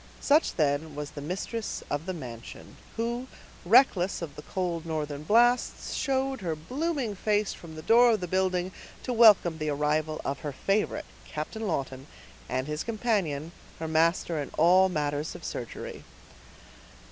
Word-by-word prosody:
Such, 300 Hz, +3 st, +3 dB
then, 150 Hz, 0 st, 0 dB
was 150 Hz, 0 st, -5 dB
the 145 Hz, -, -8 dB
mistress 195 Hz, +8 st, -4 dB
of 145 Hz, +4 st, -2 dB
the 185 Hz, -, -1 dB
mansion, 120 Hz, -7 st, -9 dB, 0.2 s
who, 235 Hz, +3 st, -2 dB, 0.4 s
reckless 190 Hz, -3 st, +4 dB
of 155 Hz, -, -7 dB
the -, -, -8 dB
cold 175 Hz, -1 st, -3 dB
northern 150 Hz, -3 st, -3 dB
blasts, 240 Hz, +8 st, +2 dB
showed 270 Hz, -2 st, -1 dB
her 165 Hz, -4 st, -2 dB
blooming 260 Hz, -, -2 dB
face 210 Hz, +1 st, 0 dB
from 160 Hz, -2 st, -11 dB
the 155 Hz, -, -8 dB
door 240 Hz, +6 st, +6 dB
of 215 Hz, -, 0 dB
the 180 Hz, -, -4 dB
building 185 Hz, 0 st, 0 dB, 0.3 s
to 250 Hz, -, -2 dB
welcome 210 Hz, -8 st, +6 dB
the 155 Hz, 0 st, -1 dB
arrival 150 Hz, +2 st, 0 dB
of 140 Hz, 0 st, -2 dB
her 145 Hz, -2 st, -5 dB
favorite, 195 Hz, +9 st, 0 dB, 0.2 s
Captain 210 Hz, +9 st, -4 dB
Lawton, 135 Hz, -4 st, -3 dB, 0.4 s
and 130 Hz, +1 st, -1 dB
his 150 Hz, +1 st, -3 dB
companion, 200 Hz, -10 st, -1 dB, 0.3 s
her 160 Hz, -, -4 dB
master 165 Hz, 0 st, +2 dB
in 140 Hz, -, -5 dB, 0.4 s
matters 150 Hz, -1 st, -2 dB
of -, -, -10 dB
surgery. -, -, -6 dB
170 Hz, 150 wpm, -28 LUFS, 150-220 Hz, 0.4 s, door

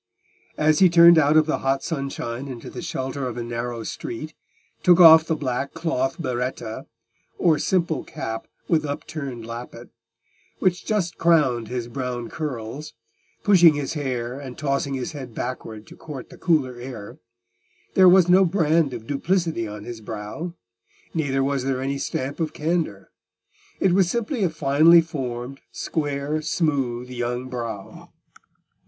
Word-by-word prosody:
As 155 Hz, 0 st, +3 dB
he 185 Hz, -, +7 dB
turned 170 Hz, 0 st, +8 dB
out 150 Hz, +1 st, +4 dB
of 155 Hz, -, +5 dB
the 155 Hz, -, -1 dB
hot 135 Hz, 0 st, 0 dB
sunshine 135 Hz, -4 st, -4 dB
into 125 Hz, -4 st, -8 dB
the -, -, -7 dB
shelter 135 Hz, -5 st, -3 dB
of 125 Hz, -1 st, -6 dB
a 120 Hz, -, -3 dB
narrow 120 Hz, 0 st, -4 dB
street, 155 Hz, +8 st, -6 dB, 0.5 s
took 180 Hz, 0 st, +5 dB
off 160 Hz, -2 st, +9 dB
the 160 Hz, -, 0 dB
black 135 Hz, 0 st, -3 dB
cloth 150 Hz, -5 st, -1 dB
berretta, 125 Hz, -5 st, -4 dB, 0.5 s
or 160 Hz, -4 st, +3 dB
simple 170 Hz, -4 st, 0 dB
cap 115 Hz, 0 st, -6 dB, 0.2 s
with 160 Hz, -3 st, +2 dB
upturned 140 Hz, -4 st, -5 dB
lappet, 120 Hz, +1 st, -8 dB, 0.7 s
which 180 Hz, -2 st, 0 dB
just 190 Hz, -6 st, -1 dB
crowned 145 Hz, -9 st, +3 dB
his 120 Hz, 0 st, -4 dB
brown 125 Hz, -1 st, -4 dB
curls, 145 Hz, 0 st, -5 dB, 0.5 s
pushing 175 Hz, -6 st, +6 dB
his 145 Hz, 0 st, -3 dB
hair 130 Hz, -4 st, -3 dB
and 130 Hz, -3 st, -9 dB
tossing 140 Hz, -1 st, -1 dB
his 130 Hz, +2 st, -4 dB
head 130 Hz, -7 st, -8 dB
backward 110 Hz, -3 st, -5 dB
to -, -, -14 dB
court 140 Hz, -5 st, -9 dB
the -, -, -12 dB
cooler 135 Hz, -8 st, +1 dB
air, 120 Hz, -5 st, -8 dB, 0.7 s
there 185 Hz, -1 st, +7 dB
was 180 Hz, -1 st, +6 dB
no 185 Hz, +2 st, +6 dB
brand 165 Hz, -6 st, +2 dB
of 115 Hz, -2 st, -8 dB
duplicity 160 Hz, -, -1 dB
on 105 Hz, 0 st, -8 dB
his 115 Hz, -1 st, -8 dB
brow; 110 Hz, +11 st, -6 dB, 0.6 s
neither 135 Hz, -4 st, 0 dB
was 135 Hz, -1 st, 0 dB
there 130 Hz, -1 st, -1 dB
any 135 Hz, +1 st, -2 dB
stamp 135 Hz, +2 st, -3 dB
of 155 Hz, -2 st, -2 dB
candour: 155 Hz, -, -2 dB, 0.7 s
it 190 Hz, -, +3 dB
was 185 Hz, -1 st, +3 dB
simply 235 Hz, +1 st, -1 dB
a 180 Hz, -, +3 dB
finely 155 Hz, +3 st, +5 dB
formed, 135 Hz, -5 st, -4 dB
square, 145 Hz, 0 st, -2 dB
smooth 135 Hz, -7 st, -1 dB
young 120 Hz, +1 st, -3 dB
brow. 115 Hz, -5 st, -6 dB
140 Hz, 150 wpm, -23 LUFS, 125-165 Hz, 0.7 s, off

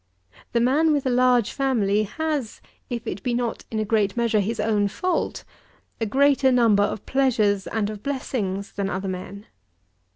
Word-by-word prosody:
The 235 Hz, -, +3 dB
man 285 Hz, +7 st, +3 dB
with 290 Hz, -2 st, 0 dB
a 260 Hz, -, +1 dB
large 250 Hz, -2 st, +3 dB
family 220 Hz, -7 st, +1 dB
has, 295 Hz, 0 st, -3 dB, 0.3 s
if 240 Hz, -1 st, -4 dB
it 195 Hz, -3 st, -4 dB
be 240 Hz, +2 st, -1 dB
not 240 Hz, -1 st, -3 dB
in 220 Hz, -, -4 dB
a 215 Hz, -, 0 dB
great 210 Hz, -1 st, +1 dB
measure 230 Hz, -2 st, +2 dB
his 215 Hz, +3 st, -2 dB
own 210 Hz, -1 st, +1 dB
fault, 365 Hz, -, -2 dB, 0.6 s
a 225 Hz, -, -1 dB
greater 275 Hz, +2 st, +3 dB
number 230 Hz, -5 st, +4 dB
of 205 Hz, 0 st, -1 dB
pleasures 220 Hz, -7 st, +1 dB
and 220 Hz, -2 st, -1 dB
of 210 Hz, -1 st, -7 dB
blessings 210 Hz, -8 st, -3 dB
than 195 Hz, -1 st, -3 dB
other 190 Hz, 0 st, -3 dB
men. 190 Hz, +2 st, -6 dB
225 Hz, 170 wpm, -24 LUFS, 205-260 Hz, 0.6 s, number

